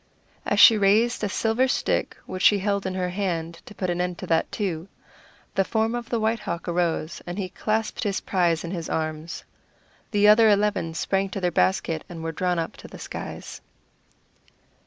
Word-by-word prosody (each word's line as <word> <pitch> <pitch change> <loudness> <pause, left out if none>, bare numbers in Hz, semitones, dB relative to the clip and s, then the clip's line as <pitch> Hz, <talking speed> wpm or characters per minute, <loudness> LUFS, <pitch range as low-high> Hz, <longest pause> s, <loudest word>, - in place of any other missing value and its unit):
As - - +1
she 225 -3 +9
raised 215 +4 +3
a 205 - 0
silver 225 +5 +1
stick - - -1
which 185 - -6
she 205 - +6
held 200 0 -1
in 185 - -3
her 180 -1 -1
hand 170 -3 -3
to 210 - -11
put 185 -2 -1
an 175 0 -1
end 180 -1 -2
to - - -6
that, 165 0 +1
too, 180 -5 -3 0.7
the 195 - +2
form 220 +3 0
of 240 -1 -4
the 235 - 0
White 220 +1 +1
Hawk 170 -2 -5
arose, 170 -2 -1
and 175 +2 -5
he 190 -3 -3
clasped 215 +3 -2
his 205 -4 -1
prize 170 -4 +1
in 170 - -5
his 170 -4 -4
arms. 155 +1 -3 0.7
The 205 -1 +3
other 215 +1 +7
eleven 205 -5 +1
sprang 195 +3 0
to 195 - -4
their 180 -2 0
basket, 165 -2 +1
and 165 -2 -7
were 165 - -2
drawn 180 +2 -1
up 165 -1 -3
to - - -11
the - - -11
skies. - - -7
190 Hz, 195 wpm, -25 LUFS, 170-210 Hz, 0.7 s, she